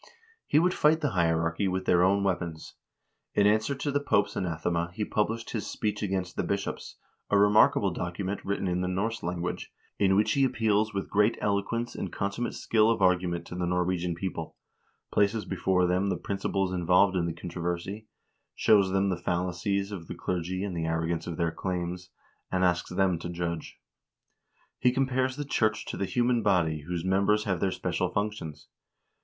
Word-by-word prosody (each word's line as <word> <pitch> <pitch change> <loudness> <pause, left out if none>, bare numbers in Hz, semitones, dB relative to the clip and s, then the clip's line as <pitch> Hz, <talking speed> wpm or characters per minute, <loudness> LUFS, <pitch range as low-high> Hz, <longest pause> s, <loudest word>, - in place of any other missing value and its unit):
He - - +3
would 180 +3 +4
fight 155 +2 +3
the 145 -4 0
hierarchy 85 0 +1
with 95 0 -2
their 85 - +4
own 100 +2 +3
weapons. 85 -4 -3 0.6
In 100 - +4
answer 110 +6 +2
to 140 +2 -2
the 145 - +1
Pope's 105 -8 +1
anathema 85 -1 -1
he 105 - -1
published 115 +2 -1
his 110 - -3
"Speech 105 -1 -2
against 95 -3 -2
the - - 0
Bishops," - - -3 0.3
a 100 - +4
remarkable 105 -1 +5
document, 90 +3 -4
written 100 -1 -2
in 90 0 0
the 90 - -1
Norse 105 +5 -1
language, 85 +1 -4 0.3
in 95 -1 +4
which 105 +2 +3
he 140 -3 +3
appeals 110 -3 +2
with 100 -2 -4
great 105 +3 +3
eloquence 105 +4 -1
and - - -5
consummate 100 +4 -2
skill 110 -1 +3
of 115 - +1
argument 90 -2 +2
to - - -9
the 90 0 -2
Norwegian 90 -1 0
people, 85 -2 -5 0.6
places 105 +1 +2
before 95 -1 +1
them 90 +3 +1
the - - 0
principles 95 -1 -2
involved 90 +2 +3
in 85 -2 +1
the - - -1
controversy, 90 +5 -4 0.5
shows 100 -3 +4
them 95 +1 +1
the 90 - -1
fal 90 +1 -1
lacies 100 +3 -2
of 85 -5 -7
the - - -6
clergy 90 +1 -3
and 100 -3 -3
the 80 -1 -2
arrogance 80 0 -1
of 85 - -4
their 85 -1 +1
claims, 90 0 -4 0.4
and 95 -1 +1
asks 90 -2 +1
them 95 -2 +1
to 85 - -6
judge. 85 -1 -4 1.0
He 125 - +4
compares 130 0 0
the 145 +1 -4
church 110 -5 0
to - - -5
the 100 - -1
human 120 +3 +1
body 85 -7 +1
whose 90 -1 -3
mem 95 +1 +2
bers 105 0 +3
have 95 -5 -1
their 95 - +1
special - - -1
functions. 100 -7 -4
95 Hz, 185 wpm, -28 LUFS, 90-105 Hz, 1.0 s, remarkable